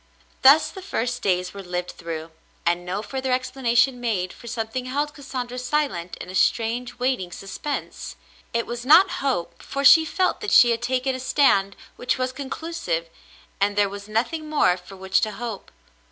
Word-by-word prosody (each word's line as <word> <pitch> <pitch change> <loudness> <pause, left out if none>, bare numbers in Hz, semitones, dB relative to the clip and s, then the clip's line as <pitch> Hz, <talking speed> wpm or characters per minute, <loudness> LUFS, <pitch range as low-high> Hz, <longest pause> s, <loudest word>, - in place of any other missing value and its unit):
Thus 280 +4 +7
the 380 - -9
first 250 - -2
days 180 -1 0
were 200 - -7
lived 180 -1 -4
through, 165 -1 -7 0.3
and 175 +1 +1
no 185 +4 -3
further 260 +3 -3
explanation 255 -1 +1
made, 195 -7 -1
for 235 - -13
something 230 +1 -3
held 290 +3 -2
Cassandra 255 -3 -5
silent 250 - -1
in - - -8
a 185 - -8
strange 235 +5 0
waiting 245 -8 -1
suspense. 195 +11 -5 0.4
It 230 0 -1
was 240 0 -5
not 325 +9 +7
hope, 175 -11 -2
for 275 0 -3
she 320 +3 +9
felt 365 +4 0
that 425 - -3
she 240 -1 +7
had 230 0 -1
taken 255 +2 0
a 260 - -4
stand 200 -7 +2 0.2
which 245 - -1
was 255 0 -1
conclusive, 265 - -4 0.5
and 200 +1 +1
there 205 -1 +3
was 200 +1 -8
nothing 305 +9 -1
more 290 -12 +3
for 180 +2 -13
which 190 0 +1
to 215 -1 -1
hope. 230 -4 -6
240 Hz, 175 wpm, -24 LUFS, 195-265 Hz, 0.5 s, she